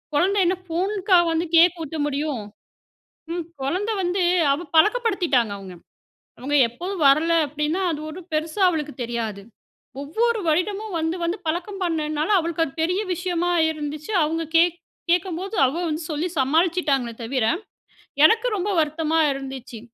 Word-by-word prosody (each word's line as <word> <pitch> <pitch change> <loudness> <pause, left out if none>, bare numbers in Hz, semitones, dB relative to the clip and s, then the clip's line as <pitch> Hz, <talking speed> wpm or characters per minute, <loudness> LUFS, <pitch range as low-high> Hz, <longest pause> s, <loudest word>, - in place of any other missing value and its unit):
குழந்த 385 +7 +2
என்ன 360 +2 +2
ஃபோனுக்கா 375 +3 +1
வந்து 325 +1 0
கேக் 340 +1 +5
ஊட்ட 315 +1 -6
முடியும்? 285 -5 -2 0.9
ம் 345 -1 -2 0.2
குழந்தை 370 +11 -1
வந்து 365 +1 0 0.3
அவ 340 +5 -4
பழக்கப்படுத்திட்டாங்க 360 - +2
அவங்க. 190 -2 -10 0.7
அவங்க 280 +4 -1
எப்போதும் 345 +7 -4
வரல 310 +5 +4
அப்டின்னா 300 +5 -2
அது 300 - -4
ஒரு 320 - -8
பெருசா 315 +5 -2
அவளுக்கு 300 -4 -3
தெரியாது. 230 -4 -4 0.6
ஒவ்வொரு 450 +11 0
வருடமும் 390 +5 -1
வந்து 320 +2 -1
வந்து 340 +3 -1
பழக்கம் 360 +5 -3
பண்ணதுனால 310 -3 -1
அவளுக்கு 330 -1 0
அது 275 - -7
பெரிய 360 +4 +1
விஷயமா 350 0 -1 0.2
இருந்துச்சு. 305 +4 -5
அவங்க 325 +2 -1
கே 330 - +7 0.5
கேட்கும்போது 360 +3 -1
அவ 260 - -2
வந்து 310 +1 -3
சொல்லி 310 +4 -1
சமாளிச்சுட்டாங்களே 285 -3 +1
தவிர, 245 +1 -1 0.8
எனக்கு 450 +9 +5
ரொம்ப 395 +1 -2
வருத்தமா 315 +1 0
இருந்துச்சு. 270 -3 -7
325 Hz, 135 wpm, -23 LUFS, 290-360 Hz, 0.9 s, கே